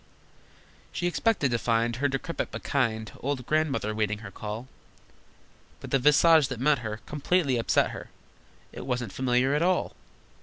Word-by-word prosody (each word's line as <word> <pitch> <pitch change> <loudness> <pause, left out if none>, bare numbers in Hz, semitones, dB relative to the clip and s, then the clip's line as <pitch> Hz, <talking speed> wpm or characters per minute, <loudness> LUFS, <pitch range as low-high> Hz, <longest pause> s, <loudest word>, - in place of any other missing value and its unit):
She 175 - -3
expected 175 - +1
to 120 - +1
find 115 0 +1
Her 145 +2 +1
decrepit 135 +5 -3
but - - -7
kind 110 -6 -1
Old 135 -2 -3
Grandmother 150 -8 0
waiting 105 -1 -1
her 100 - -8
call, 110 +5 -6 1.1
But - - -9
the 135 - +3
visage 150 +2 +5
that 130 -3 -5
met 145 +1 +3
her 110 -1 -5
Completely 150 -2 +1
upset 115 - +2
her: - - -8 0.6
It - - -8
wasn't 125 -6 -2
familiar 130 +1 +1
at 150 - +1
all! 180 +1 +1
130 Hz, 155 wpm, -27 LUFS, 115-150 Hz, 1.1 s, visage